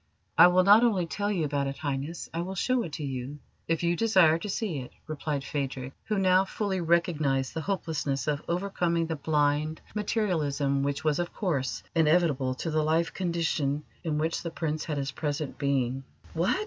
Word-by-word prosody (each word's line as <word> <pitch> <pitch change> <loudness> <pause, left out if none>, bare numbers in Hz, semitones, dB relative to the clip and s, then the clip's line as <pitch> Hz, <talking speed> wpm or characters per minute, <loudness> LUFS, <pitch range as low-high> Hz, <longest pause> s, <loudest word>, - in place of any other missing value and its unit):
"I - - +9
will 180 +1 +4
not 205 +4 +7
only 200 -7 +2
tell 205 +5 -2
you 175 -6 0
about 140 -1 -1
it, 135 - -4
Highness, 145 +3 -3
I 165 - -1
will 190 +2 -4
show 255 +6 +1
it 165 -9 -6
to 160 - -4
you, 135 +1 -4 0.3
if 165 0 0
you 170 0 +2
desire 185 -7 +4
to 210 - -5
see 190 -7 -2
it," 125 - -8
replied 150 -2 -3
Phadrig, 135 -3 -3
who 215 -1 -1
now 185 -1 +4
fully 195 -1 -2
recognised 155 -6 +1
the 160 - -3
hopelessness 155 -7 -2
of 150 -1 -1
overcoming 175 -2 0
the 160 0 -2
blind 150 +1 +1
materialism 155 -10 0
which 140 0 -1
was, 155 0 +1
of 175 0 -3
course, 135 - -1
inevitable 155 -5 +2
to 165 +5 -3
the 155 0 +2
life 160 +2 +1
condition 165 -5 -1 0.2
in 155 -3 -1
which 160 +2 -1
the 170 - -4
Prince 155 -2 -3
had 150 -3 -3
his 140 0 -2
present 150 -1 -3
being. 135 -2 0 0.3
"What! 170 - +1
160 Hz, 185 wpm, -28 LUFS, 145-175 Hz, 0.3 s, I